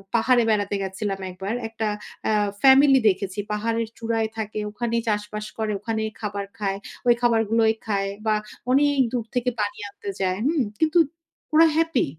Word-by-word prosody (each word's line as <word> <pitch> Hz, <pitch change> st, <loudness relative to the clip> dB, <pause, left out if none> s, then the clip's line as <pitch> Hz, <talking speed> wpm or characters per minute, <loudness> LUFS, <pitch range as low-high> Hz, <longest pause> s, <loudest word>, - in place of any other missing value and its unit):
পাহাড়ে 240 Hz, +1 st, +4 dB
বেড়াতে 205 Hz, -2 st, +1 dB
গেছিলাম 195 Hz, +1 st, -3 dB
একবার। 190 Hz, +4 st, -4 dB
একটা 225 Hz, 0 st, -3 dB, 0.4 s
আ -, -, +3 dB, 0.3 s
ফ্যামিলি 270 Hz, 0 st, +7 dB
দেখেছি। 190 Hz, 0 st, -2 dB
পাহাড়ের 225 Hz, +2 st, -1 dB
চূড়ায় 225 Hz, -1 st, -1 dB
থাকে, 215 Hz, -1 st, -3 dB
ওখানেই 230 Hz, +1 st, -1 dB
চাষবাস 210 Hz, 0 st, -2 dB
করে, 220 Hz, -1 st, -1 dB
ওখানেই 220 Hz, 0 st, -2 dB
খাবার 205 Hz, -2 st, -3 dB
খায়। 195 Hz, -2 st, -1 dB, 0.3 s
ঐ -, -, -3 dB
খাবারগুলোই 225 Hz, -1 st, +3 dB
খায় 200 Hz, -2 st, 0 dB, 0.2 s
বা 215 Hz, -1 st, +3 dB, 0.4 s
অনেক 285 Hz, +1 st, +3 dB
দূর 240 Hz, -3 st, -1 dB
থেকে 250 Hz, 0 st, +1 dB
পানি 205 Hz, -1 st, -1 dB
আনতে 200 Hz, -, -8 dB
যায়। 185 Hz, -1 st, 0 dB
হুম? 300 Hz, -1 st, +2 dB, 0.2 s
কিন্তু 315 Hz, +1 st, +2 dB, 0.6 s
ওরা 320 Hz, +2 st, +7 dB
হ্যাপি। 325 Hz, -4 st, +2 dB
220 Hz, 155 wpm, -24 LUFS, 205-240 Hz, 0.6 s, ফ্যামিলি